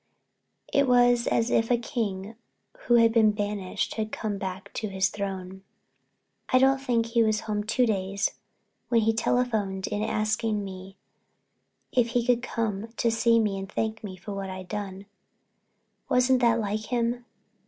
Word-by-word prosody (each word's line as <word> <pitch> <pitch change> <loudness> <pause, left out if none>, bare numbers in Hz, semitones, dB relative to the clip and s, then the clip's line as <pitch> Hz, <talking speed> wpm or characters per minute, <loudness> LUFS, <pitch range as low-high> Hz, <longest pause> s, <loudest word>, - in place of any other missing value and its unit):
It 280 -1 +4
was 245 -1 +4
as 230 0 +1
if 225 0 +2
a 245 - +4
king 215 -4 -3 0.5
who 240 - +4
had 230 -1 +5
been 220 -2 +5
banished 205 -2 -2
had 215 0 -2
come 210 -3 -3
back 190 +1 -6
to 220 - -3
his 190 0 +1
throne. 190 -2 -5 0.9
I 255 - +4
don't 270 +1 +4
think 240 -4 +1
he 230 0 +1
was 215 -1 +2
home 210 -1 -2
two 245 +4 +2
days 200 -2 0 0.6
when 230 -2 +4
he 225 +1 +2
telephoned 220 -5 0
in 210 - -2
asking 215 -1 0
me 190 0 -9 0.9
if 245 -2 +3
he 240 - +1
could 245 -1 +3
come 225 -4 -2
to 230 - +2
see 230 0 +3
me 205 -3 0
and 195 +1 -7
thank 220 0 -2
me 190 -3 -7
for 200 +3 -7
what 195 -1 -4
I'd 185 -1 -7
done. 200 -2 -5 1.0
Wasn't 250 +1 +3
that 235 -1 +4
like 215 0 -2
him? 240 0 -1
220 Hz, 165 wpm, -27 LUFS, 195-235 Hz, 1.0 s, had